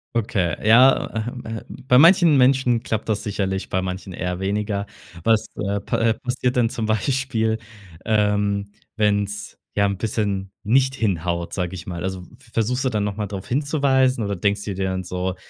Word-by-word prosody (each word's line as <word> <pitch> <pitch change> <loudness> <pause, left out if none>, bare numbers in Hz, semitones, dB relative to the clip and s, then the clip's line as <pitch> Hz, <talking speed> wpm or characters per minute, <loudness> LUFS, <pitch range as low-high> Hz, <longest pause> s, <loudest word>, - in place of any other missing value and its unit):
Okay, 95 -7 0
ja, 125 +4 +6 0.2
ähm 125 0 -6
ähm, 110 0 -5 0.2
bei 125 - +6
manchen 170 +1 +7
Menschen 125 -3 +3
klappt 110 -3 -3
das 110 -2 -1
sicherlich, 95 -3 -2
bei 95 - 0
manchen 95 0 -5
eher 90 +1 -4
weniger. 100 +1 -1 0.4
Was, 110 +1 +3
äh, 100 0 -2
pa - - -2
äh, 115 -1 +3
passiert 125 +1 -2
denn 120 -2 +3
zum 115 -1 -3
Beispiel, 110 0 0 0.4
ähm, 105 -2 +1 0.2
wenn's 100 -1 0 0.2
ja 100 - +2
'n 100 0 0
bisschen 100 -2 -2
nicht 130 +4 +3
hinhaut, 85 -6 -1
sage 90 -1 -2
ich 90 0 -9
mal. 85 -1 -5
Also, 95 -1 -4
v - - -15 0.3
versuchst 125 +3 0
du 130 - +1
dann 105 -3 -1
noch 100 - -3
mal 105 -1 -3
drauf 100 -1 -7
hinzuweisen 135 -2 +2
oder 100 0 -2
denkst 100 +2 0
dir 100 -2 -4
dann 95 -1 -2
so: 90 +1 -3
105 Hz, 180 wpm, -22 LUFS, 95-120 Hz, 0.4 s, manchen